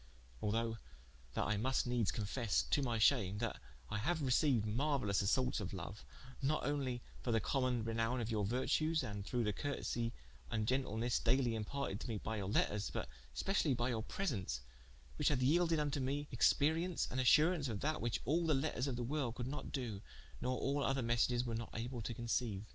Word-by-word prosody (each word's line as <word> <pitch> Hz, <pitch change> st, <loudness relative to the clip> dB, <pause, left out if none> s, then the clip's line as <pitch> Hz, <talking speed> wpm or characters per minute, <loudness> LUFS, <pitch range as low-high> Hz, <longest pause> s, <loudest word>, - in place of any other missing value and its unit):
Although 115 Hz, +1 st, 0 dB, 0.6 s
that -, -, +1 dB
I 110 Hz, -, +1 dB
must 130 Hz, +5 st, +1 dB
needes 120 Hz, -4 st, +1 dB
confesse 110 Hz, +1 st, 0 dB
(to 145 Hz, -, +1 dB
my 120 Hz, -4 st, 0 dB
shame) 110 Hz, -4 st, +4 dB
that 115 Hz, +1 st, -3 dB, 0.3 s
I 105 Hz, -, -2 dB
haue 165 Hz, +11 st, +1 dB
receiued 135 Hz, -4 st, +3 dB
marueilous 115 Hz, -3 st, +1 dB
assaultes 125 Hz, +6 st, +2 dB
of 95 Hz, -2 st, -4 dB
loue, 95 Hz, 0 st, -5 dB, 0.5 s
not 140 Hz, +1 st, +1 dB
onely 130 Hz, -4 st, -1 dB, 0.2 s
for 120 Hz, -, -1 dB
the 115 Hz, -, +4 dB
common 125 Hz, +1 st, 0 dB
renowme 115 Hz, +2 st, 0 dB
of 115 Hz, -1 st, -2 dB
your 105 Hz, -2 st, +1 dB
vertues, 150 Hz, +8 st, +1 dB
and 105 Hz, -4 st, -4 dB
through 120 Hz, +4 st, -1 dB
the 105 Hz, -1 st, 0 dB
curtesie 120 Hz, -3 st, -2 dB, 0.4 s
and 110 Hz, -2 st, -1 dB
gentlenesse 120 Hz, -2 st, +1 dB
dayly 130 Hz, -3 st, +3 dB
imparted 110 Hz, -1 st, -3 dB
to -, -, -6 dB
me 115 Hz, -3 st, -2 dB
by 110 Hz, +2 st, -3 dB
your 100 Hz, -2 st, -3 dB
letters, 105 Hz, 0 st, +1 dB
but -, -, -3 dB, 0.3 s
specially 170 Hz, -8 st, +1 dB
by 120 Hz, +1 st, 0 dB
your 115 Hz, -3 st, -1 dB
presence, 105 Hz, -, -2 dB, 0.6 s
whiche -, -, +2 dB
hath 130 Hz, -4 st, +1 dB
yelded 165 Hz, +4 st, +4 dB
vnto 145 Hz, -2 st, 0 dB
me 140 Hz, +3 st, -1 dB
experience 160 Hz, +8 st, +2 dB
and 130 Hz, -, -1 dB
assuraunce 150 Hz, +3 st, +5 dB
of 105 Hz, -3 st, -3 dB
that, 155 Hz, +2 st, 0 dB
whiche 120 Hz, -1 st, -1 dB
all 165 Hz, +6 st, +2 dB
the 155 Hz, -, +4 dB
letters 135 Hz, -1 st, 0 dB
of 130 Hz, -, -1 dB
the 120 Hz, -, -2 dB
world 130 Hz, -2 st, -1 dB
could 120 Hz, -, -3 dB
not 140 Hz, +3 st, -5 dB
do, 115 Hz, -8 st, -3 dB, 0.4 s
nor 125 Hz, 0 st, 0 dB
all 140 Hz, +1 st, 0 dB
other 135 Hz, -1 st, +1 dB
messages 120 Hz, +1 st, +2 dB
were 120 Hz, -, -2 dB
not 115 Hz, 0 st, -3 dB
able 120 Hz, +2 st, -3 dB
to 115 Hz, +2 st, -4 dB
conceiue. 115 Hz, -3 st, -1 dB
125 Hz, 195 wpm, -37 LUFS, 110-140 Hz, 0.6 s, assuraunce